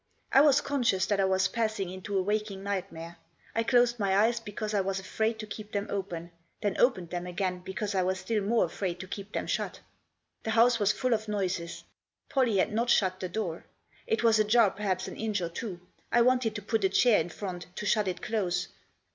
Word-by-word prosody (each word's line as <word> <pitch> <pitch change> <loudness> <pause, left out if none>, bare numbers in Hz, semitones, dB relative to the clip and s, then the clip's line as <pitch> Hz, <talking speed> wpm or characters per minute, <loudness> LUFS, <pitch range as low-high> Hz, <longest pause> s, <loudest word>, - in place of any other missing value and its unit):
I 270 - +7
was 290 -1 +5
con 280 -1 -2
scious 190 -5 +3
that 205 -1 +2
I 195 - +4
was 190 0 +2
passing 215 -5 -1
into 190 +2 -4
a 190 - +2
waking 205 -1 -2
nightmare. 175 -4 -4 0.4
I 230 - +1
closed 240 0 +3
my 195 -2 +2
eyes 230 +3 +3
because 215 -1 -5
I 205 - +3
was 195 0 -1
afraid 220 +4 -1
to 215 - -6
keep 215 0 -9
them 200 0 -1
open; 175 -4 -4 0.3
then 205 -2 0
opened 185 -9 +2
them 175 0 -3
again 180 0 -2
because 200 +3 -4
I 190 - +2
was 185 +1 0
still 210 +3 -1
more 220 +1 +2
afraid 175 +1 -4
to 185 - -8
keep 200 +1 -7
them - - -2
shut. - - -2 0.6
The - - -5
house 235 +1 +5
was 205 -1 +4
full 255 +1 0
of 220 0 -1
noises. 185 -5 -2 0.5
Pollie 250 -7 +2
had 190 - +1
not 235 +2 0
shut 185 -5 +3
the 185 - -4
door. 175 -4 -4 0.4
It 450 -1 0
was 225 -2 +5
ajar 215 -1 +5
perhaps 190 -2 -2
an - - -7
inch 215 -2 -1
or 170 -2 -2
two. 180 +1 -6 0.3
I 240 - +5
wanted 250 -3 +2
to 210 - -5
put 220 0 0
a 190 - +4
chair 225 +1 +4
in 165 - -5
front, 180 -1 -6
to 210 - -5
shut 210 -1 +2
it 180 -1 -3
close. 205 -5 -1
205 Hz, 220 wpm, -29 LUFS, 185-225 Hz, 0.6 s, I